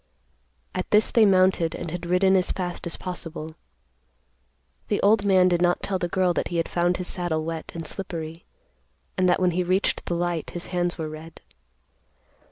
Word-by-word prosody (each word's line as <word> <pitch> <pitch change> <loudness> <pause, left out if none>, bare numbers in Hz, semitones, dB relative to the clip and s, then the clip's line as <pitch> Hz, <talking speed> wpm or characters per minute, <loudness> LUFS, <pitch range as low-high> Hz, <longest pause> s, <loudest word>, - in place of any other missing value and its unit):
At - - -3
this 210 +1 +4
they 225 -3 +5
mounted 185 -3 +3
and 170 - -5
had 175 0 -5
ridden 190 +2 +3
as 185 0 +3
fast 175 -1 -4
as 170 - -4
possible. 165 -3 -5 1.3
The 205 - 0
old 205 0 +4
man 185 -2 +5
did 175 -1 +1
not 175 0 +2
tell 190 -2 -1
the 175 - -1
girl 180 0 +1
that - - -1
he 175 - -3
had 165 - 0
found 175 +1 +1
his 180 - -4
saddle 160 -3 -2
wet 165 -1 -5
and 165 -1 -5
slippery, 165 -2 -6 0.7
and 185 0 +2
that - - +3
when 180 -1 +3
he 180 +2 0
reached 185 +3 +1
the 175 - -1
light 175 -2 -2
his 175 - -6
hands 175 0 0
were 160 -2 -3
red. 155 +1 -10
175 Hz, 185 wpm, -25 LUFS, 165-185 Hz, 1.3 s, they